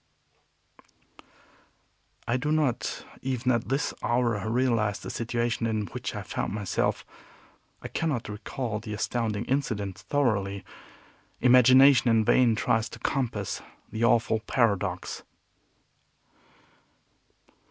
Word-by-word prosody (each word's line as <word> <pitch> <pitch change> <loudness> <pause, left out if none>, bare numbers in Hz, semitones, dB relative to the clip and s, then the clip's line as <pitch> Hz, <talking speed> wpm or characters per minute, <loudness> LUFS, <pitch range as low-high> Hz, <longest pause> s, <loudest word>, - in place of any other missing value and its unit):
I 120 - +1
do 140 +4 -1
not, 150 -6 0 0.2
even 130 -1 0
at 120 -1 -1
this 135 +2 0
hour, 115 -3 0
realize 115 -4 +1
the - - -7
situation 115 0 -1
in 110 -2 -1
which - - -6
I - - -4
found - - -3
myself. 100 -4 -1 0.8
I - - -4
cannot 150 -8 -2
recall 105 +2 -4
the 110 -1 -6
astounding 110 -1 -2
incident 105 -9 -2
thoroughly. 100 -9 -1 0.7
Imagination 130 +1 +6
in 110 -1 +3
vain 120 -1 +4
tries 110 0 +1
to - - -10
compass 130 -4 -2 0.3
the 110 +2 -2
awful 115 -1 +3
paradox. 100 -6 -1
115 Hz, 105 wpm, -27 LUFS, 105-130 Hz, 0.8 s, Imagination